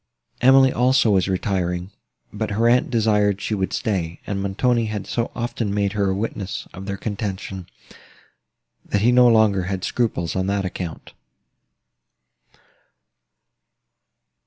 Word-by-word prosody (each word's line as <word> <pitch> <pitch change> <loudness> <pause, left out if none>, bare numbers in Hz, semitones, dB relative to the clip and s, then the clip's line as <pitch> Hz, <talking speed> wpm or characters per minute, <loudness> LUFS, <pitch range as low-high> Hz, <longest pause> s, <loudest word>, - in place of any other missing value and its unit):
Emily 130 +1 +6
also 125 -2 +3
was 95 -2 +2
retiring, 95 -2 -2 0.4
but 110 +1 -3
her 110 +3 +1
aunt 125 +7 +3
desired 105 -4 +2
she 110 - -3
would 95 -2 -1
stay; 85 -6 -2
and 100 -1 -3
Montoni 115 +4 +1
had 105 -2 -4
so 115 -1 -2
often 120 -3 -3
made 100 -1 0
her 100 -2 +1
a 95 - 0
witness 100 -2 -4
of 95 +2 -9
their 100 -1 -3
contention, 95 -3 -5 1.2
that 100 - -1
he 120 +3 +4
no 125 0 +6
longer 110 -5 +3
had 95 -1 -3
scruples 95 -9 -1
on 95 0 -1
that 100 -1 -1
account. 90 -3 -6
100 Hz, 135 wpm, -22 LUFS, 95-115 Hz, 1.2 s, Emily